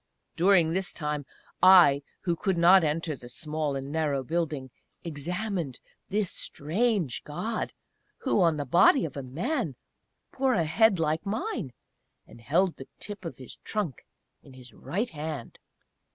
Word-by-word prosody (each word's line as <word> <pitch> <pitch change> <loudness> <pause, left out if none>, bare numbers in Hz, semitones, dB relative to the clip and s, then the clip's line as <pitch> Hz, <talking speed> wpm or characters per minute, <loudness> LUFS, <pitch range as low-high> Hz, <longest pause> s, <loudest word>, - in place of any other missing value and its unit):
During 175 -2 +4
this 190 0 -1
time 150 -3 -3 0.3
I, 175 -6 +7 0.2
who 175 -2 0
could 190 +1 -1
not 175 +2 +7
enter 155 +1 -1
the 120 -2 -12
small 150 +1 -3
and 135 +1 -5
narrow 150 -4 0
building, 150 -3 -2 0.3
examined 170 - -3 0.3
this 205 -2 0
strange 175 - -1
God, 220 +10 -3 0.5
who 260 -7 +1
on 165 -3 +3
the 145 - -2
body 175 - +5
of 150 - -7
a 140 - -4
Man 160 - -2 0.6
bore 265 -1 +2
a 170 - +2
head 195 +4 +3
like 160 0 0
mine, 215 - -3 0.5
and 115 - -15
held 170 +9 +1
the 135 - -10
tip 205 -3 -8
of 165 - -6
his 130 - -10
trunk 200 - -4 0.4
in 135 - -16
his 125 -2 -13
right 215 +7 -3
hand! 150 -5 -6
165 Hz, 150 wpm, -28 LUFS, 145-195 Hz, 0.6 s, I